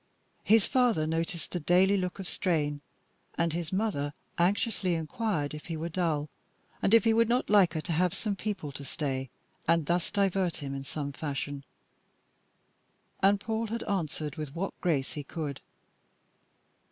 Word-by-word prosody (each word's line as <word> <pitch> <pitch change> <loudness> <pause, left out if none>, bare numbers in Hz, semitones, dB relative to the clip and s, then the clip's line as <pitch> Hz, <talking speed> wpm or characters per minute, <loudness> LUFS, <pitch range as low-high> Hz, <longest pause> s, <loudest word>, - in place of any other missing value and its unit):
His 220 -1 +5
father 245 -11 +3
noticed 165 +1 -2
the 180 - -1
daily 180 +5 +4
look 180 -2 -1
of 195 -2 -5
strain, 150 -7 0 0.6
and 165 -1 +1
his 170 -1 -3
mother 185 -8 -1 0.2
anxiously 190 0 +2
inquired 160 -2 -1
if 150 - -8
he 165 -2 -3
were 165 +2 -3
dull, 160 -4 0 0.5
and 210 - +5
if 230 - +6
he 225 -1 +4
would 230 0 +4
not 245 -2 +1
like 190 -6 +5
her 155 - 0
to 155 - -4
have 175 +2 +2
some 210 -3 -1
people 195 -7 -3
to 140 +1 -8
stay, 135 -2 -2 0.4
and 165 -2 +3
thus 170 +2 +1
divert 195 -3 +1
him 140 -2 -5
in 135 0 -5
some 140 0 -4
fashion. 140 -1 -4 1.6
And 200 +1 +5
Paul 225 +1 -2
had 230 +2 -3
answered 155 -6 -2
with 150 -1 -5
what 195 +3 -2
grace 150 -7 +1
he 150 - -5
could. 145 -1 -5
170 Hz, 165 wpm, -30 LUFS, 150-195 Hz, 1.6 s, if